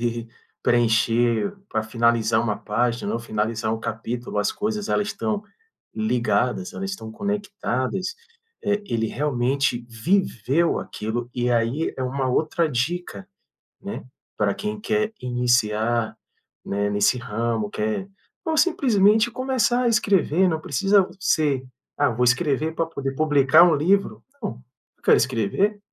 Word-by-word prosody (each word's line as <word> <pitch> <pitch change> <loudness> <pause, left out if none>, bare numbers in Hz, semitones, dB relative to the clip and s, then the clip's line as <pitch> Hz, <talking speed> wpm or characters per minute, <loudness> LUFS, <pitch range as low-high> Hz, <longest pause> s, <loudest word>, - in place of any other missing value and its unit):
poder 120 -1 -2 0.3
preencher 120 - +2
pra 110 - -1
finalizar 115 0 +2
uma 105 -3 -1
página 120 +3 -1
ou - - -1
finalizar 110 -1 -2
um 115 - -2
capítulo, 115 0 -4
as 105 - +1
coisas, 210 0 -3
elas 205 - +1
estão 210 +1 -2 0.5
ligadas, 125 - 0
elas 195 0 -4
estão 110 -13 -7
conectadas, 200 - -2 0.5
eh, 205 0 0
ele 115 - 0
realmente 130 -1 0
viveu 155 - +1
aquilo, 120 +3 -4
e 125 0 0
aí 120 +6 0
é 130 - -3
uma 130 +1 -1
outra 155 +5 +1
dica, 175 +8 -3 0.6
né, 200 +2 -6 0.3
pra 105 -1 +1
quem 210 +1 -4
quer 215 0 0
iniciar, 120 -2 +1 0.5
né, 100 +1 -1
nesse 105 +4 +2
ramo, 115 -2 -2
quer 110 - -2 0.4
não 320 -1 0
simplesmente 220 - +4
começar 250 -1 +1
a - - +2
escrever, 195 -5 +3
não 160 -2 -1
precisa 195 +8 +2
ser: 145 -8 +1 0.3
"Ah, 145 -1 +3
vou 120 +1 0
escrever 145 +4 +1
pra 165 - 0
poder 135 -4 -4
publicar 150 +1 +5
um 170 -3 +5
livro". 195 +7 +1 0.2
Não, 210 - -2 0.5
eu - - -38
quero - - +6
escrever, 195 - 0
130 Hz, 135 wpm, -23 LUFS, 115-195 Hz, 0.6 s, quero